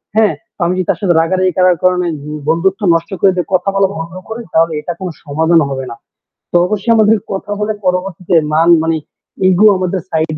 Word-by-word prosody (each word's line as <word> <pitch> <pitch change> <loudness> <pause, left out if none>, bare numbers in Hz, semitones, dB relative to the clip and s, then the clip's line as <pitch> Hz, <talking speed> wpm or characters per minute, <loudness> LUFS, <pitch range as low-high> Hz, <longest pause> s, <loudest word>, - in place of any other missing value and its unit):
হ্যাঁ? 220 -2 +3 0.3
আমি 175 +1 +1
যদি 185 - -1
তার - - +1
সাথে 185 -3 +2
রাগারাগি 185 +2 +1
করার 180 -1 +4
কারণে 180 -1 +2 0.4
বন্ধুত্ব 190 +5 +1
নষ্ট 165 +3 -3
করে 195 - +5
দিয়ে 180 - -2
কথা 185 +2 +1
বলা 195 -1 +3
ভঙ্গ 165 +1 -6 0.2
করি 230 +2 -6
তাহলে 165 0 +2
এটা 175 - -4
কোন 185 -2 -4
সমাধান 160 +3 +2
হবে 135 -1 -4
না। 115 - -7 0.6
তো - - -5
অবশ্যই 210 +4 -1
আমাদের 220 0 +4
কথা 195 +1 -5
বলে 210 +1 -1
পরবর্তীতে 180 -1 -1 0.2
মান 165 +2 +3
মানে 165 0 0 0.5
ইগো 190 +4 +5
আমাদের 185 0 -2
সাইড 160 -1 -1
180 Hz, 190 wpm, -14 LUFS, 165-195 Hz, 0.6 s, করে